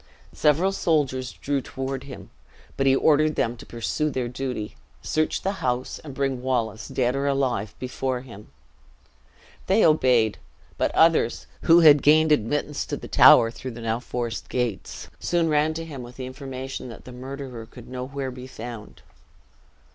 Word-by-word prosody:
Several 160 +6 +3
soldiers 140 -8 0
drew 140 -1 -2
toward 135 +1 -5
him; 140 - -10 0.4
but 135 - +1
he 135 - +5
ordered 155 +2 +3
them 120 +1 0
to - - -12
pursue 120 +6 -2
their 130 -4 -2
duty, 125 -3 -4 0.3
search 155 0 0
the 195 - +1
house, 125 0 -2
and 140 -4 -10
bring 135 -2 -1
Wallace, 115 -5 -1
dead 125 0 0
or 140 +1 -1
alive, 125 -7 -1
before 130 0 -3
him. 115 -5 -12 1.2
They 205 +3 +4
obeyed; 125 -8 +3 0.4
but - - +1
others, 160 -7 +3 0.2
who 170 +1 +7
had 150 -3 +8
gained 155 +1 +5
admittance 145 +2 0
to - - -3
the - - -9
tower 115 - +7
through 130 +2 -7
the - - -7
now 115 0 -1
forced 120 -2 -4
gates, 120 -5 -3
soon 170 -1 +1
ran 155 +1 +2
to 165 0 -4
him 145 -5 -8
with 120 +1 -11
information 130 0 -6
that 115 - -11
the 125 - -10
murderer 130 -2 -7
could 125 0 -13
nowhere 130 +1 -5
be 125 0 -9
found. 115 -3 -9
130 Hz, 160 wpm, -24 LUFS, 125-150 Hz, 1.2 s, had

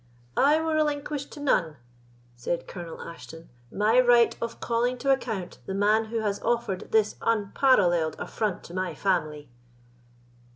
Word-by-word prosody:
"I 295 +3 +4
will 320 0 -1
relinquish 295 -2 -1
to 295 - -12
none," 180 - +1 0.6
said 120 +8 -3
Colonel 170 -3 -8
Ashton, 165 0 -10 0.2
"my 215 +4 +3
right 240 -2 +5
of 230 0 -4
calling 240 +2 0
to 275 +2 +1
account 220 -9 -2
the 190 - -3
man 210 +2 +3
who 225 +1 -3
has 205 -2 -2
offered 230 -6 -2
this 215 -2 +2
unparalleled 200 - +2
affront 210 -5 -3
to 170 - -11
my 185 0 -3
family." 155 -6 -1
215 Hz, 140 wpm, -26 LUFS, 180-250 Hz, 0.6 s, right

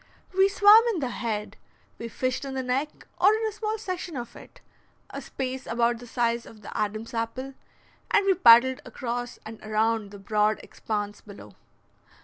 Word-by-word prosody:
We 385 +1 +5
swam 410 +2 +7
in - - -2
the 260 -4 -2
head, 215 -3 -4 0.4
we 230 - -5
fished 255 +4 -2
in 270 -1 -5
the 260 - -2
neck, 265 +4 -3
or 390 - +6
in 445 0 -2
a 435 - -1
small 430 +1 -3
section 365 -7 -5
of 240 -1 -7
it, - - -14 0.5
a - - -6
space 260 -1 -5
about 235 0 +1
the 245 - -11
size 235 0 -1
of 215 -2 -15
the - - -9
Adam's 215 +2 -3
apple, 235 +4 -4 0.6
and 405 - +3
we 390 - +5
paddled 255 -5 +6
across 245 -1 -5
and 220 0 -9
around 215 0 0
the 200 - -11
broad 210 +1 +1
expanse 205 -1 -5
below. 200 - -13
240 Hz, 175 wpm, -26 LUFS, 220-275 Hz, 0.6 s, swam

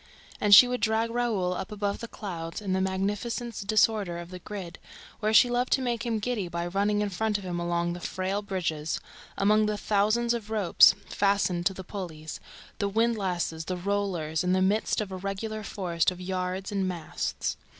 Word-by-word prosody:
And 205 -1 +8
she 250 - +10
would 250 0 -2
drag 225 +1 +1
him 240 - -3
up 190 -5 -1
above 205 -1 -2
the 230 - -6
clouds, 170 -7 -6
in 195 -3 -2
the 190 - +1
magnificent 205 +4 -2
disorder 210 -4 +2
of 170 +1 -8
the 180 - -7
grid, 180 -2 -7 0.4
where 215 0 +1
she 220 - +7
loved 245 +1 0
to 270 - +2
make 240 -1 -1
him 225 -2 0
giddy 215 -3 -2
by 170 0 -3
running 200 +3 +1
in 205 - 0
front 215 +2 0
of 200 - -9
him 175 -2 -3
along 170 0 0
the 175 - -6
frail 190 +3 -2
bridges, 165 -6 -2 0.4
among 210 +2 +3
the 210 0 -1
thousands 215 +4 +2
of 225 -3 -5
ropes 210 -5 +6
fastened 195 -3 +1
to 195 - -2
the 190 - -7
pulleys, 165 -6 -7 0.4
the 200 - 0
windlasses, 195 -7 0
the 185 0 -3
rollers, 180 -5 -1
in 180 0 +1
the 185 - +3
midst 210 +3 +1
of 205 -2 -5
a 190 - -4
regular 200 +3 -4
forest 180 -5 0
of 180 -1 -8
yards 185 +1 -3
and 195 -2 0
masts. 175 -4 -3
195 Hz, 190 wpm, -28 LUFS, 180-215 Hz, 0.4 s, she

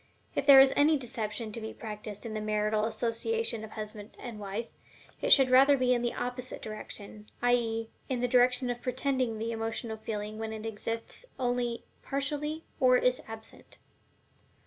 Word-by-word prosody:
If 280 - -2
there 275 -1 +11
is 270 0 +7
any 300 +2 +5
deception 225 -4 -4
to 230 - -6
be 220 - -6
practiced 210 -1 -7
in 225 - -4
the 215 - -3
marital 215 0 +1
association 230 - -1
of 220 - -9
husband 215 -1 -7
and 235 -4 -7
wife, 205 +3 -4 0.5
it - - +1
should 265 -2 +7
rather 275 +2 +7
be 250 -1 +3
in 240 - +1
the 240 0 -1
opposite 250 +1 -4
direction, 215 -1 -8
i. 245 0 +3
e., 225 -2 0 0.2
in 255 -2 -1
the 245 - +1
direction 250 0 +3
of 240 0 -6
pretending 255 -2 0
the 225 +1 -2
emotional 225 0 -3
feeling 215 0 -5
when 220 0 -4
it 220 0 -6
exists 225 - -5
only 245 -2 -1 0.2
partially 295 +3 -2 0.2
or 255 -1 +6
is 250 0 +2
absent. 220 0 -8
235 Hz, 170 wpm, -30 LUFS, 220-255 Hz, 0.5 s, there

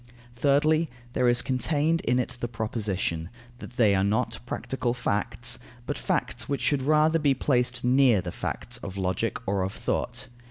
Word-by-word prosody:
Thirdly, 150 +5 +3 0.2
there 125 - +3
is 120 0 +4
contained 150 +5 +1
in 125 +1 +1
it 125 - -1
the 120 - -2
proposition: 105 -7 -2 0.3
that 125 - -10
they 110 -4 +4
are 95 0 +2
not 110 +5 0
practical 125 -1 -2
facts, 105 -5 -1 0.3
but - - -2
facts - - -1
which 140 - -1
should 145 -2 +1
rather 155 +3 +3
be 145 -3 +3
placed 125 -2 0
near 125 -3 +4
the 90 -1 -4
facts 120 +7 -4
of 100 -5 -7
logic 95 +7 -1
or 100 -1 +1
of 95 +1 -2
thought. - - -3
125 Hz, 165 wpm, -27 LUFS, 105-140 Hz, 0.3 s, is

